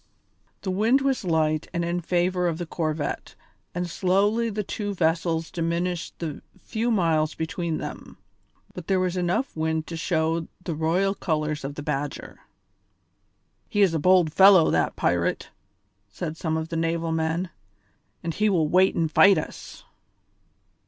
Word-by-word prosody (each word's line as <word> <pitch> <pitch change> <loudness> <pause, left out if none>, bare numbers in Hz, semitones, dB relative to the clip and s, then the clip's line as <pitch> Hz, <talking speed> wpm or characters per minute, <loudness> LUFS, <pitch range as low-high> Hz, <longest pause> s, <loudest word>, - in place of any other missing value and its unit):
The 190 - -1
wind 225 +8 +3
was 270 -4 0
light 155 -3 +1
and 170 0 0
in 175 +1 -1
favour 180 +1 +1
of 165 -2 -1
the 175 - -4
corvette, 155 -3 -3 0.4
and 180 0 -1
slowly 200 +6 +1
the 210 0 -3
two 205 +1 -4
vessels 165 -1 0
diminished 170 +1 -2
the 160 -4 -5 0.2
few 225 +2 -2
miles 165 -7 +1
between 160 0 -3
them; - - -8 0.6
but 180 -3 -9
there 190 -1 +2
was 185 -1 0
enough 180 +9 -1
wind 160 0 -1
to 165 - -6
show 165 -1 0 0.2
the 170 - -3
royal 170 +5 +1
colours 155 -5 -2
on 140 +1 -4
the 145 - -7
Badger. 145 -1 -4 1.3
"He 205 - +3
is 185 -4 +3
a 160 - 0
bold 180 -1 +4
fellow, 190 -3 +7
that - - +1
pirate," - - 0 0.6
said 155 - -5
some 160 -1 -2
of 160 0 -4
the 170 - -4
naval 165 0 -1
men, 160 +2 -1 0.7
"and 165 -1 -2
he 215 +5 +2
will 165 -6 +2
wait 185 +4 +4
and 160 -2 0
fight 195 +3 +6
us." 155 - -7
170 Hz, 155 wpm, -25 LUFS, 160-185 Hz, 1.3 s, fellow